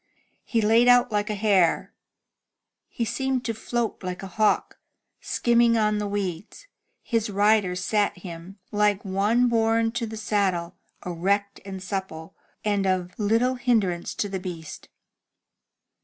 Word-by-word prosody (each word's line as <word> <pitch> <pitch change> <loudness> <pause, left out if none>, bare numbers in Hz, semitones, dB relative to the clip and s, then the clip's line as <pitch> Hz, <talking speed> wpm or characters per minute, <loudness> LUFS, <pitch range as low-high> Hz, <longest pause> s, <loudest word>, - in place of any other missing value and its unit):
He 230 -3 0
laid 225 +3 +4
out 245 -1 +5
like 210 +1 0
a 210 - -1
hare. 195 -5 +2 0.9
He 235 - -3
seemed 255 +2 -1
to 230 - -1
float 230 +1 -3
like 180 0 -5
a 190 -2 -8
hawk, 215 +1 +1 0.4
skimming 235 -1 +2
the 210 -2 +1
weeds, 200 - -4
and - - -40
his 225 -2 0
rider 205 -2 +2
sat 205 +2 0
him 175 +2 -9
like 210 -1 +1
one 205 +6 +2
bom 225 -1 +2
to 235 0 -3
the 220 0 -7
saddle, 190 -5 -1 0.3
erect 200 +3 -1
and 190 -1 -7
supple, 185 -5 -5 0.3
and 200 -2 +1
of 185 -1 0
little 225 +5 +2
hindrance 215 -9 0
to 205 - -1
the 195 -1 -4
beast. 170 -4 -8
205 Hz, 140 wpm, -25 LUFS, 190-225 Hz, 0.9 s, out